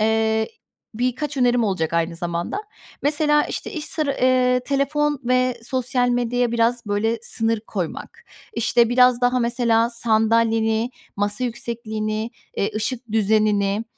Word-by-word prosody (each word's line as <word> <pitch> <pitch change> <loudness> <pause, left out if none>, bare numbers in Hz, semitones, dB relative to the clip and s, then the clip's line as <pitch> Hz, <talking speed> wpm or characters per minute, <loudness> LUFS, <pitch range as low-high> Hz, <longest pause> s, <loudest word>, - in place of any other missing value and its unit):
eee, 220 0 +1 0.5
birkaç 255 +5 -2
önerim 245 -2 +3
olacak 185 -6 -1
aynı 170 0 0
zamanda. 170 - -3 0.5
Mesela, 295 +1 +3
işte, - - -5
iş 310 -3 -4
sıra 310 -4 -1
eee, 255 -1 +3
telefon 290 +1 0
ve 255 0 +2
sosyal 250 0 0
medyaya 245 0 0
biraz, 235 0 +1
böyle, 220 +3 0
sınır 225 -1 +1
koymak, 210 - -6 0.3
işte, 235 - +2
biraz 250 0 +4
daha 250 +1 +2
mesela 235 -1 +2
sandalyeni, 225 0 +1 0.3
masa 205 +4 -1
yüksekliğini, 220 -2 -3 0.3
eee, 200 - 0
ışık 230 +1 -3
düzenini, 210 -1 +2
235 Hz, 125 wpm, -22 LUFS, 220-250 Hz, 0.5 s, biraz